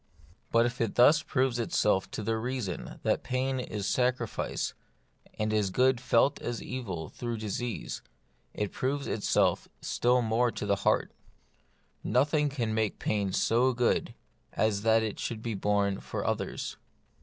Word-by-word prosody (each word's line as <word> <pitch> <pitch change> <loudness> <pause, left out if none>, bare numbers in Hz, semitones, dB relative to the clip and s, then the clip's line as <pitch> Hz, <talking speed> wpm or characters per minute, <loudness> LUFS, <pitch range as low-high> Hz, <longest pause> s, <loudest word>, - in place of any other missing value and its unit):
But 115 0 +5
if 120 0 -2
it 115 - 0
thus 150 +6 +6
proves 130 -5 0
itself 105 -4 +1
to 110 - -5
the 110 +2 0
reason 115 - -4
that - - +1
pain 130 +1 -1
is 105 -5 -3
sacrifice, 125 -1 0 0.6
and 110 0 0
is 105 -2 +2
good 125 +4 +3
felt 135 +2 +3
as 120 -1 -3
evil 95 - -5
through 120 -1 -4
disease, 110 - -4 0.5
it 105 -1 -3
proves 140 +2 -1
itself 105 - +1
still 125 0 +2
more 115 +2 +2
to - - -4
the 100 -1 +2
heart - - +1 0.9
Nothing 150 +3 +2
can 120 -6 -2
make 110 -1 0
pain 100 -3 -1
so 125 +6 +3
good 120 0 +1 0.4
as 110 -2 +1
that 110 +1 +4
it 110 -2 -3
should 115 -2 -4
be 115 - -2
borne 100 -1 +1
for - - -5
others. - - -2
115 Hz, 150 wpm, -29 LUFS, 105-125 Hz, 0.9 s, thus